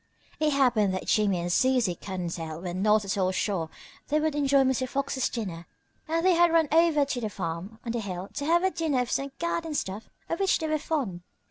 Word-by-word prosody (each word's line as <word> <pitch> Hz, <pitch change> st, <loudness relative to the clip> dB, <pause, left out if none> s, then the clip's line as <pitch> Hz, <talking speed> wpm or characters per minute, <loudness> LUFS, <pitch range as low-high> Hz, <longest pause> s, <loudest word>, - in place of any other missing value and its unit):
It 310 Hz, 0 st, +3 dB
happened 235 Hz, -8 st, +3 dB
that 185 Hz, -, -4 dB
Jimmie 200 Hz, -5 st, +2 dB
and 175 Hz, +1 st, -2 dB
Susie 250 Hz, -6 st, +3 dB
Cottontail 170 Hz, -3 st, -5 dB
were 175 Hz, -1 st, -4 dB
not 210 Hz, +3 st, +2 dB
at 195 Hz, +1 st, -2 dB
all 185 Hz, -1 st, +2 dB
sure 185 Hz, -4 st, -1 dB, 0.4 s
they 300 Hz, +1 st, +2 dB
would 310 Hz, 0 st, 0 dB
enjoy 280 Hz, -1 st, +3 dB
Mr. 260 Hz, -1 st, 0 dB
Fox's 270 Hz, -1 st, -1 dB
dinner, 180 Hz, -8 st, -5 dB, 0.4 s
and 330 Hz, +2 st, 0 dB
they 370 Hz, -, +6 dB
had 345 Hz, 0 st, +4 dB
run 330 Hz, -2 st, +4 dB
over 320 Hz, -2 st, +4 dB
to 260 Hz, -3 st, -3 dB
the 215 Hz, -, -2 dB
farm 185 Hz, +3 st, -5 dB
on 230 Hz, -, -2 dB
the 235 Hz, -, -2 dB
hill 190 Hz, -3 st, -5 dB
to 285 Hz, -, -3 dB
have 340 Hz, +3 st, +3 dB
a 380 Hz, -, +2 dB
dinner 310 Hz, -8 st, 0 dB
of 245 Hz, -, -3 dB
some 275 Hz, 0 st, -1 dB
garden 335 Hz, -2 st, -2 dB
stuff 200 Hz, -3 st, -4 dB, 0.2 s
of 335 Hz, -, -2 dB
which 390 Hz, -1 st, +3 dB
they 320 Hz, -, -3 dB
were 310 Hz, 0 st, 0 dB
fond. 260 Hz, -, -2 dB
245 Hz, 220 wpm, -27 LUFS, 190-305 Hz, 0.4 s, they